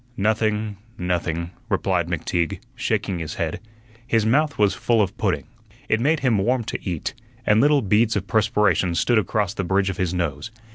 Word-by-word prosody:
"Nothing, 110 Hz, 0 st, 0 dB, 0.2 s
nothing," 85 Hz, -1 st, -2 dB, 0.2 s
replied -, -, +1 dB
McTeague, 85 Hz, -2 st, -1 dB, 0.2 s
shaking 90 Hz, -3 st, -1 dB
his 80 Hz, -2 st, -5 dB
head. -, -, -2 dB, 0.5 s
His 115 Hz, -3 st, +2 dB
mouth 145 Hz, +6 st, +2 dB
was 105 Hz, -2 st, +3 dB
full 120 Hz, -2 st, +1 dB
of 100 Hz, -4 st, +1 dB
pudding. -, -, 0 dB, 0.4 s
It 110 Hz, -, +2 dB
made 150 Hz, +6 st, +2 dB
him 120 Hz, -6 st, +2 dB
warm 120 Hz, +4 st, +1 dB
to -, -, -5 dB
eat, 85 Hz, -4 st, -3 dB, 0.3 s
and 105 Hz, +1 st, +4 dB
little 145 Hz, -1 st, +4 dB
beads 105 Hz, +3 st, +3 dB
of 100 Hz, -2 st, -1 dB
perspiration 100 Hz, -4 st, +2 dB
stood 120 Hz, +5 st, +3 dB
across 100 Hz, 0 st, -1 dB
the 100 Hz, -, -3 dB
bridge 95 Hz, +2 st, +1 dB
of 90 Hz, -, -8 dB
his 90 Hz, -2 st, 0 dB
nose. 85 Hz, -2 st, -2 dB
105 Hz, 175 wpm, -23 LUFS, 90-115 Hz, 0.5 s, and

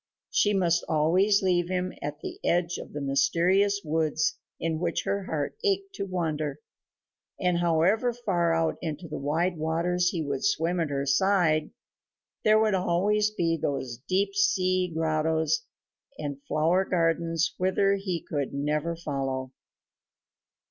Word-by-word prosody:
She 205 Hz, 0 st, +3 dB
must 175 Hz, -3 st, +2 dB
always 185 Hz, +7 st, +3 dB
leave 175 Hz, -2 st, +2 dB
him 185 Hz, 0 st, -1 dB
at 145 Hz, 0 st, -5 dB
the -, -, -7 dB
edge 175 Hz, 0 st, +1 dB
of -, -, -9 dB
the 145 Hz, -, -5 dB
mysterious 175 Hz, +9 st, +2 dB
woods 160 Hz, -, 0 dB, 0.2 s
in 160 Hz, -1 st, -1 dB
which 170 Hz, -1 st, -1 dB
her 200 Hz, -1 st, -2 dB
heart 150 Hz, -5 st, -3 dB
ached 395 Hz, -1 st, 0 dB
to 200 Hz, -, -4 dB
wander, 155 Hz, -5 st, -2 dB, 0.8 s
and, 180 Hz, -1 st, +1 dB
however 175 Hz, +8 st, +2 dB
far 190 Hz, -8 st, 0 dB
out 165 Hz, -1 st, 0 dB
into 160 Hz, 0 st, -5 dB
the 150 Hz, -, -5 dB
wide 165 Hz, +5 st, 0 dB
waters 175 Hz, +3 st, +1 dB
he 170 Hz, -3 st, -2 dB
would 140 Hz, -2 st, -3 dB
swim 175 Hz, -3 st, +1 dB
at 165 Hz, -3 st, 0 dB
her 140 Hz, -1 st, -2 dB
side, 160 Hz, +1 st, +2 dB, 0.7 s
there 215 Hz, 0 st, +5 dB
would 215 Hz, -1 st, +3 dB
always 195 Hz, +4 st, +2 dB
be 170 Hz, -6 st, 0 dB
those 130 Hz, -4 st, -3 dB
deep 195 Hz, +2 st, +1 dB
sea 185 Hz, -2 st, +2 dB
grottoes 160 Hz, 0 st, 0 dB, 0.5 s
and 145 Hz, -2 st, -5 dB
flower 165 Hz, +5 st, +2 dB
gardens 165 Hz, -1 st, 0 dB
whither 190 Hz, +2 st, +2 dB
he 185 Hz, -4 st, -4 dB
could 140 Hz, -2 st, -3 dB
never 150 Hz, +4 st, -1 dB
follow. 135 Hz, -5 st, -3 dB
170 Hz, 140 wpm, -27 LUFS, 155-190 Hz, 0.8 s, there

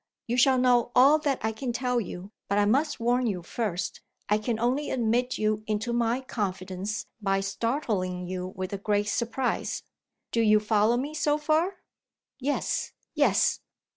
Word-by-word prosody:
You 235 Hz, -, -1 dB
shall 260 Hz, +1 st, +5 dB
know 245 Hz, -1 st, +3 dB
all 275 Hz, +5 st, +7 dB
that 285 Hz, -3 st, 0 dB
I 220 Hz, -, +1 dB
can 240 Hz, +3 st, -4 dB
tell 250 Hz, 0 st, 0 dB
you, 190 Hz, 0 st, -7 dB, 0.2 s
but 200 Hz, -, 0 dB
I 205 Hz, -, +4 dB
must 285 Hz, +8 st, +1 dB
warn 245 Hz, +1 st, +2 dB
you 185 Hz, -5 st, -2 dB
first. 180 Hz, -3 st, -3 dB, 0.3 s
I 210 Hz, +1 st, +3 dB
can 220 Hz, +1 st, -2 dB
only 255 Hz, +5 st, 0 dB
admit 245 Hz, +1 st, +1 dB
you 215 Hz, 0 st, 0 dB
into 215 Hz, +3 st, -1 dB
my 235 Hz, +2 st, +1 dB
confidence 195 Hz, -3 st, -3 dB, 0.2 s
by 195 Hz, -1 st, +1 dB
startling 195 Hz, -4 st, -2 dB
you 180 Hz, 0 st, -4 dB
with 185 Hz, +1 st, -4 dB
a 200 Hz, -, -3 dB
great 205 Hz, 0 st, 0 dB
surprise. 240 Hz, +3 st, -1 dB, 0.5 s
Do 230 Hz, -, +2 dB
you 215 Hz, -1 st, +5 dB
follow 215 Hz, +2 st, +2 dB
me, 285 Hz, +5 st, -3 dB
so 295 Hz, -1 st, +1 dB
far?" 320 Hz, +5 st, 0 dB, 0.6 s
"Yes! 280 Hz, +2 st, -1 dB, 0.2 s
yes!" -, -, +3 dB
230 Hz, 165 wpm, -27 LUFS, 205-255 Hz, 0.6 s, all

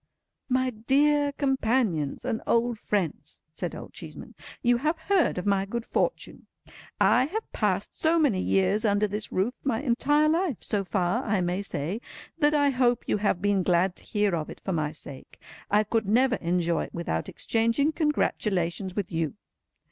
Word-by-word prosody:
"My 255 Hz, 0 st, +1 dB
dear 285 Hz, +6 st, +2 dB
companions 240 Hz, -, 0 dB
and 240 Hz, -3 st, -1 dB
old 235 Hz, -1 st, +1 dB
friends," 200 Hz, -7 st, -3 dB
said -, -, -4 dB
Old -, -, -9 dB
Cheeseman, -, -, -9 dB, 0.3 s
"you 240 Hz, -1 st, +4 dB
have 310 Hz, +6 st, 0 dB
heard 355 Hz, -, +1 dB
of 180 Hz, -, -3 dB
my 200 Hz, -1 st, +2 dB
good 230 Hz, +4 st, -4 dB
fortune. -, -, -2 dB, 0.5 s
I 250 Hz, -, +4 dB
have 435 Hz, +8 st, -5 dB
passed -, -, -1 dB
so 325 Hz, +1 st, +2 dB
many 280 Hz, -, +2 dB
years 195 Hz, +3 st, +2 dB
under 205 Hz, -1 st, +2 dB
this 210 Hz, +1 st, -3 dB
roof—my 235 Hz, +5 st, -1 dB
entire 295 Hz, +4 st, +3 dB
life 325 Hz, -, +1 dB
so 205 Hz, -2 st, -1 dB
far, 190 Hz, +5 st, 0 dB
I 210 Hz, -4 st, 0 dB
may 180 Hz, +2 st, -1 dB
say—that 225 Hz, -, -2 dB
I 285 Hz, -1 st, +3 dB
hope 250 Hz, -2 st, +2 dB
you -, -, +1 dB
have 200 Hz, -3 st, 0 dB
been 205 Hz, -1 st, +2 dB
glad 180 Hz, +1 st, +2 dB
to -, -, -12 dB
hear 205 Hz, -4 st, 0 dB
of 155 Hz, -2 st, -4 dB
it -, -, -9 dB
for 190 Hz, -, -3 dB
my 155 Hz, -2 st, -1 dB
sake. 140 Hz, -3 st, -9 dB, 0.3 s
I 210 Hz, +1 st, +4 dB
could 215 Hz, -1 st, -1 dB
never 250 Hz, +4 st, +3 dB
enjoy 170 Hz, -1 st, 0 dB
it -, -, -13 dB
without 125 Hz, -, -2 dB
exchanging 230 Hz, +7 st, +1 dB
congratulations 195 Hz, -, -1 dB
with 200 Hz, -3 st, -3 dB
you. 165 Hz, -2 st, -2 dB
220 Hz, 165 wpm, -27 LUFS, 185-265 Hz, 0.5 s, you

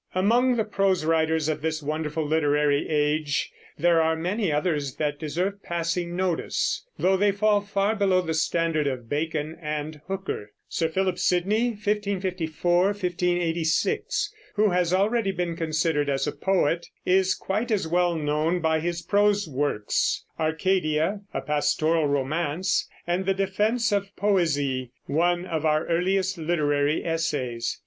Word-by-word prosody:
Among 240 Hz, +7 st, +3 dB
the 225 Hz, -, +1 dB
prose 195 Hz, -5 st, +1 dB
writers 160 Hz, -1 st, +2 dB
of 155 Hz, -2 st, -1 dB
this 155 Hz, -1 st, -2 dB
wonderful 155 Hz, +1 st, -2 dB
literary 145 Hz, -1 st, +1 dB
age 150 Hz, -1 st, 0 dB, 0.3 s
there 170 Hz, +1 st, +4 dB
are 160 Hz, 0 st, +2 dB
many 180 Hz, +3 st, -1 dB
others 150 Hz, -3 st, -1 dB
that 145 Hz, -2 st, -2 dB
deserve 180 Hz, +6 st, -2 dB
passing 170 Hz, 0 st, -2 dB
notice, 185 Hz, -, -1 dB
though 190 Hz, +1 st, +3 dB
they 200 Hz, +2 st, +3 dB
fall 205 Hz, +1 st, +2 dB
far 200 Hz, +1 st, 0 dB
below 195 Hz, -3 st, +3 dB
the 165 Hz, -2 st, -3 dB
standard 160 Hz, -1 st, +1 dB
of 125 Hz, -4 st, -4 dB
Bacon 155 Hz, +2 st, -2 dB
and 150 Hz, -1 st, -4 dB
Hooker. 190 Hz, -, -4 dB
Sir 165 Hz, -1 st, -1 dB
Philip 185 Hz, +1 st, 0 dB
Sidney 200 Hz, +7 st, +2 dB
(1554 185 Hz, -5 st, 0 dB
1586), 175 Hz, -4 st, 0 dB, 0.2 s
who 210 Hz, -1 st, +3 dB
has 175 Hz, -1 st, +1 dB
already 205 Hz, +3 st, +2 dB
been 175 Hz, -2 st, -2 dB
considered 155 Hz, -2 st, 0 dB
as 135 Hz, -1 st, 0 dB
a 150 Hz, -, -1 dB
poet, 170 Hz, -3 st, 0 dB, 0.2 s
is 190 Hz, 0 st, +3 dB
quite 215 Hz, +5 st, -2 dB
as 205 Hz, -7 st, 0 dB
well 175 Hz, +1 st, +2 dB
known 155 Hz, +3 st, 0 dB
by 160 Hz, -1 st, +1 dB
his 170 Hz, +1 st, -3 dB
prose 205 Hz, +1 st, +2 dB
works, 135 Hz, -7 st, -1 dB
Arcadia, 160 Hz, +2 st, +1 dB
a -, -, -3 dB
pastoral 155 Hz, +2 st, +1 dB
romance, 150 Hz, +6 st, 0 dB, 0.2 s
and 180 Hz, +2 st, -1 dB
the 195 Hz, -, +2 dB
Defense 210 Hz, +4 st, +1 dB
of 200 Hz, 0 st, -1 dB
Poesie, 145 Hz, -10 st, +1 dB, 0.2 s
one 175 Hz, +4 st, +1 dB
of 160 Hz, -4 st, -3 dB
our 155 Hz, 0 st, +2 dB
earliest 185 Hz, +2 st, 0 dB
literary 150 Hz, -2 st, +1 dB
essays. 145 Hz, -8 st, -2 dB
170 Hz, 140 wpm, -25 LUFS, 155-190 Hz, 0.3 s, there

